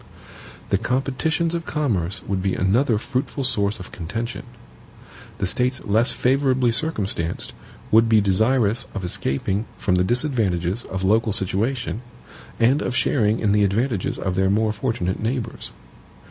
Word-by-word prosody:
The - - +3
competitions 140 +6 0
of 170 -1 -3
commerce 105 - -1
would 95 -2 -2
be 95 -1 0
another 110 +6 +2
fruitful 135 +4 -3
source 105 -5 +1
of 95 - -9
contention. 115 +8 -5 0.9
The - - -1
States 125 +6 0
less 110 +4 +3
favorably 130 -2 +2
circumstanced 100 - -1 0.4
would 115 +1 +5
be 110 -1 +5
desirous 110 +3 +2
of 95 -3 -3
escaping 95 +6 -1
from 90 - 0
the 90 0 +3
disadvantages 110 - 0
of 95 0 -4
local 110 +2 +2
situation, 110 +5 -1 0.6
and 130 +6 +3
of 125 - -2
sharing 110 -5 +2
in 105 - +2
the 105 0 +3
advantages 105 +1 0
of 95 - -2
their 95 +1 +2
more 105 +2 +2
fortunate 110 -5 -2
neighbors. 115 0 -3
110 Hz, 140 wpm, -22 LUFS, 95-125 Hz, 0.9 s, would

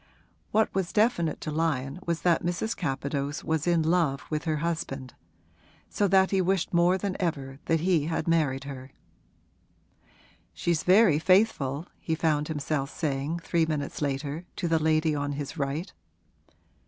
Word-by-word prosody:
What 220 0 +2
was 190 -2 -1
definite 210 -8 +1
to 155 - -4
Lyon 150 -2 -1
was 170 -1 -1
that 175 -2 +3
Mrs. 175 +6 -1
Capadose 140 -1 -3
was 160 0 -1
in 170 -2 +3
love 160 -4 +1
with 155 +1 -2
her 160 -1 +1
husband; 150 -5 -3 0.8
so 205 - +1
that 190 0 +4
he 195 -1 +3
wished 185 -1 0
more 175 +2 +4
than 190 0 -3
ever 140 -6 -3
that 165 -1 +1
he 170 -4 +2
had 165 +2 -2
married 150 -5 +1
her. 135 -2 -8 1.7
'She's 170 -2 0
very 185 -4 +5
faithful,' 170 -6 +2
he 160 - -2
found 150 -2 +1
himself 145 -2 -2
saying 150 +2 -2
three 165 -2 +1
minutes 150 -2 -3
later 145 +3 -2
to 175 - -2
the 165 -1 +2
lady 155 0 +2
on 145 0 -2
his 145 0 -5
right. 140 +6 -3
160 Hz, 155 wpm, -27 LUFS, 145-175 Hz, 1.7 s, very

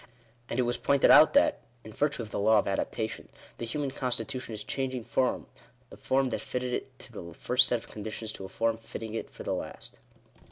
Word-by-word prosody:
And 115 - -2
it 130 - +3
was 120 0 0
pointed 140 -1 +4
out 155 +2 +8
that, 295 +1 +4 0.2
in 110 - -10
virtue 145 -2 0
of 105 - -10
the - - -2
law 110 +2 +5
of 105 - +2
adaptation, 110 +3 -2 0.3
the 115 - -3
human 140 +3 -2
constitution 125 -2 -3
is 105 - -5
changing 130 -3 -2
from 130 +3 0 0.5
the - - -9
form 135 0 +1
that - - -2
fitted 125 0 -3
it - - -4
to - - -10
the 85 -1 -8
first 125 +1 +3
set 120 - +2
of 115 - -12
conditions 110 +1 -6
to 95 - -8
a - - -8
form 115 +3 0
fitting 115 -1 -7
it 115 - -4
for - - -10
the - - -1
last. - - -6
120 Hz, 215 wpm, -29 LUFS, 110-130 Hz, 0.5 s, out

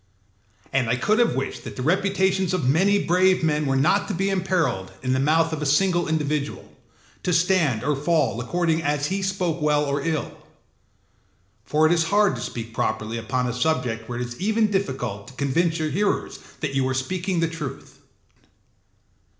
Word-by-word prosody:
And 130 -3 +1
I 120 - +2
could 210 - +1
have 240 - +3
wished 135 +1 -3
that - - -8
the 125 - -4
reputations 190 +2 +1
of 150 -8 -1
many 195 +9 +3
brave 185 +1 +3
men 150 -2 +1
were 135 - +1
not 160 +9 +2
to - - -3
be 195 +3 0
imperilled 165 - 0
in 130 0 +1
the 130 - +1
mouth 160 +3 +2
of 155 - -3
a - - -1
single 175 +4 +2
individual, 150 -2 -2 0.5
to 180 - -1
stand 165 - +2
or 150 0 +1
fall 140 -5 +1
according 165 +4 0
as 145 -1 0
he 195 - -1
spoke 185 -4 -1
well 150 -1 +2
or 140 0 -1
ill. 155 0 -2 1.3
For 155 +1 +2
it 155 - +4
is 165 -2 +2
hard 205 +3 +3
to - - -6
speak 115 -1 -6
properly 110 +1 -2
upon 125 +2 -1
a 120 - -2
subject 125 -4 -1
where 120 - -4
it 125 - -2
is 120 +4 -9
even 215 +1 +2
difficult 120 - -2
to - - -12
convince 160 +5 +1
your 155 -2 -2
hearers 200 +7 -1 0.2
that 150 -4 -2
you 135 -1 +1
are 130 - -1
speaking 180 +7 -2
the 165 - +2
truth. 160 -5 -7
155 Hz, 185 wpm, -23 LUFS, 130-185 Hz, 1.3 s, it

